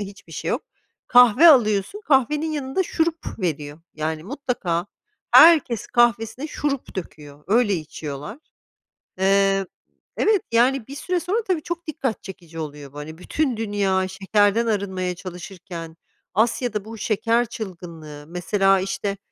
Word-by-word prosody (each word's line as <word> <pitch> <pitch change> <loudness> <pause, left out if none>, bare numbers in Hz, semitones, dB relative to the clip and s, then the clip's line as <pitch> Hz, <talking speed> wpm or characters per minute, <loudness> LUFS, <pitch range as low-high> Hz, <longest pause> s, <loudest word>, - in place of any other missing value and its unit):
hiçbir 200 -4 -9
şey - - -5
yok. - - -1 0.4
Kahve 245 +6 +7
alıyorsun, 215 - +3
kahvenin 300 +3 +2
yanında 290 +4 -1
şurup 330 -5 -2
veriyor, 155 -4 -3
yani, 155 0 -3
mutlaka 205 - -2 0.4
herkes 300 -9 +6
kahvesine 240 +3 +1
şurup 285 -6 -3
döküyor, 150 -5 -8
öyle 215 0 +3
içiyorlar. 155 - -6 0.8
Eee, 195 0 +3 0.5
evet, 420 -3 +2
yani, 245 +1 +3
bir 275 - -9
süre 355 +6 -1
sonra 410 +7 -1
tabii 365 -6 -1
çok 345 +1 -5
dikkat 275 -7 -3
çekici 170 -4 -10
oluyor 145 -3 -7
bu; 145 - -11
hani, 155 +2 -8
bütün 270 +5 -1
dünya 200 -3 0
şekerden 205 +4 +2
arınmaya 190 -4 -1
çalışırken 175 -2 -9 0.4
Asya'da 220 0 0
bu 225 +1 -9
şeker 230 +3 +1
çılgınlığı. 170 -9 -8
Mesela, 195 +3 +2
işte, 195 +1 -3
205 Hz, 125 wpm, -23 LUFS, 180-255 Hz, 0.8 s, Kahve